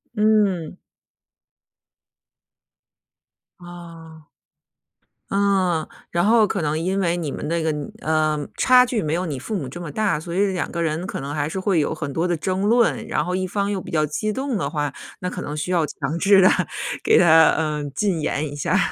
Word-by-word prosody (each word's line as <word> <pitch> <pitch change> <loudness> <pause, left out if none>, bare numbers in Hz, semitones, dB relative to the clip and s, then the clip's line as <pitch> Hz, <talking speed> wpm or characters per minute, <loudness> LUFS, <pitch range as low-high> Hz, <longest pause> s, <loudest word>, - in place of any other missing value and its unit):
嗯。 205 -6 +1 2.8
哦。 165 -3 -12 1.0
嗯， 190 -5 +1 0.2
然 170 0 +1
后 220 0 +5
可 200 - -2
能 155 0 -1
因 185 +4 -1
为 175 -3 +1
你 160 -5 -3
们 150 - -5
的 170 +2 0
一 - - -2
个， 160 - +1
嗯 150 -2 -5
呃， 155 -1 0
差 250 -1 +6
距 240 -3 -1
没 155 -1 -2
有 180 +2 -1
你 145 -6 -4
父 215 - -5
母 155 -9 -3
这 135 +7 -8
么 165 -4 -6
大， 205 -6 0
所 170 +2 -7
以 200 +2 +3
两 180 - -3
个 170 - -3
人 165 +3 -2
可 - - -5
能 140 +1 -5
还 145 -1 -1
是 190 - -4
会 185 -2 +1
有 150 - 0
很 145 -3 -5
多 165 +4 0
的 175 - 0
争 185 +4 -2
论， 230 +3 +2
然 - - 0
后 180 +1 -2
一 185 0 -1
方 200 +2 -1
又 195 -2 -2
比 - - -10
较 155 -2 +2
激 215 +8 -2
动 265 0 -2
的 140 -6 -2
话， 145 -2 -2 0.3
那 180 - -2
可 180 - -6
能 150 - -5
需 150 +4 -3
要 170 -3 +2
强 155 +2 -4
制 195 +1 +5
地 185 - +7 0.5
给 - - +4
他， 160 -2 +6
嗯， 150 -2 -2
禁 195 -7 0
言 150 0 -1
一 - - -7
下。 145 - 0
170 Hz, 215 characters per minute, -22 LUFS, 155-195 Hz, 2.8 s, 地